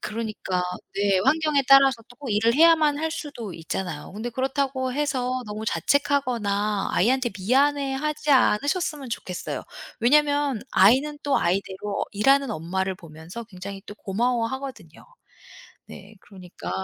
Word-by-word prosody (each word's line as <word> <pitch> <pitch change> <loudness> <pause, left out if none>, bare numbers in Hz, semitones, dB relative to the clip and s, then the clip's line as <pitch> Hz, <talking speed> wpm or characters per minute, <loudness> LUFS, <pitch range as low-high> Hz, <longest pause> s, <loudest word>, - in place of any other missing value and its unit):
그러니까 210 -4 -3 0.3
네 200 -1 +2
환경에 290 +4 +2
따라서 270 -4 +6
또 245 - -17
꼭 255 - -4
일을 225 +3 +2
해야만 310 -2 +5
할 320 0 -1
수도 285 - -6
있잖아요. 165 -1 -5
그런데 220 +4 -5
그렇다고 260 +1 -1
해서 255 -3 -1
너무 210 +1 -6
자책하거나 215 - 0
아이한테 250 +4 +2
미안해하지 280 +6 +1
않으셨으면 285 - +2
좋겠어요. 180 -5 -5 0.4
왜냐면 285 -1 +2
아이는 270 +9 +4
또 285 -1 +1
아이대로 195 +3 -2
일하는 270 +6 +3
엄마를 190 +1 -2
보면서 165 +6 -10
굉장히 195 -1 -9
또 205 - -9
고마워하거든요. 245 +6 -3 0.8
네 200 +2 -12
그러니까 185 - -10
240 Hz, 340 characters per minute, -24 LUFS, 200-280 Hz, 0.8 s, 따라서